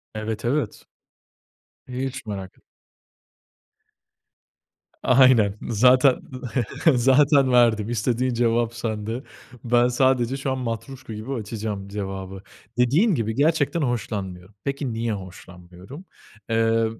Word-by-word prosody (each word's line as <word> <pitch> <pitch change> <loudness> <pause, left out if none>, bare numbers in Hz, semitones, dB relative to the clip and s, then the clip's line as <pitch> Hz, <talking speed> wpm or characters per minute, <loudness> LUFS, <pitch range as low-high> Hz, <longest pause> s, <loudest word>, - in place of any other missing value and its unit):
Evet, 110 +1 -4
evet. 130 -2 -1 1.1
Hiç 130 0 -5
merak 95 -3 -7
et - - -30 2.4
Aynen 125 -6 +5
zaten, 125 +4 +4 0.7
zaten 135 +2 +4
verdim. 115 -3 +3
İstediğin 120 +2 0
cevap 115 0 +1
sende. 115 +1 -4 0.4
Ben 120 0 +3
sadece 130 0 +1
şu 135 0 -2
an 130 - -1
matruşka 125 0 -6
gibi 110 +6 -5
açacağım 105 -3 -5
cevabı. 95 -1 -6 0.4
Dediğin 155 - +3
gibi, 110 -3 -2
gerçekten 160 +3 +1
hoşlanmıyorum. 100 -7 -4
Peki 140 -3 -3
niye 115 0 -2
hoşlanmıyorum? 90 - -11 0.4
Eee, 115 0 +2
120 Hz, 100 wpm, -23 LUFS, 105-130 Hz, 2.4 s, Aynen